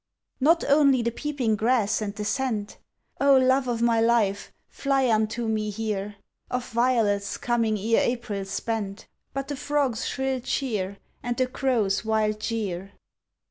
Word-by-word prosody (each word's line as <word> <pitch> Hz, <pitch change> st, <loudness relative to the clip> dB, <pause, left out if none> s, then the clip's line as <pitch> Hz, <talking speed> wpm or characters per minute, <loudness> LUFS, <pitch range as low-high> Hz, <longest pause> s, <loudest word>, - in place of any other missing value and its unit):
Not 325 Hz, +5 st, +4 dB
only 280 Hz, -3 st, +4 dB
the 235 Hz, -, 0 dB
peeping 255 Hz, -4 st, -1 dB
grass 220 Hz, -1 st, +1 dB
and 205 Hz, -1 st, -3 dB
the 210 Hz, -, -4 dB
scent 215 Hz, -2 st, -2 dB, 0.4 s
(Oh, 275 Hz, -1 st, +6 dB
love 260 Hz, 0 st, +3 dB
o' 240 Hz, -, 0 dB
my 230 Hz, 0 st, +2 dB
life, 225 Hz, -4 st, +1 dB, 0.2 s
fly 275 Hz, -2 st, 0 dB
unto 220 Hz, +2 st, 0 dB
me 215 Hz, -1 st, -1 dB
here!) 210 Hz, -1 st, -3 dB, 0.3 s
Of 250 Hz, 0 st, -3 dB
violets 225 Hz, -4 st, +1 dB
coming 230 Hz, -3 st, 0 dB
ere 225 Hz, +3 st, +2 dB
April's 215 Hz, -5 st, -2 dB
spent 205 Hz, -1 st, -3 dB, 0.3 s
But 275 Hz, 0 st, -4 dB
the 290 Hz, -, -3 dB
frog's 280 Hz, -4 st, -1 dB
shrill 265 Hz, -1 st, -1 dB
cheer 210 Hz, -7 st, -2 dB, 0.2 s
And 240 Hz, -1 st, -3 dB
the 255 Hz, -, +3 dB
crow's 245 Hz, -7 st, 0 dB
wild 215 Hz, -1 st, 0 dB
jeer! 200 Hz, -4 st, -3 dB
230 Hz, 145 wpm, -25 LUFS, 210-260 Hz, 0.4 s, Oh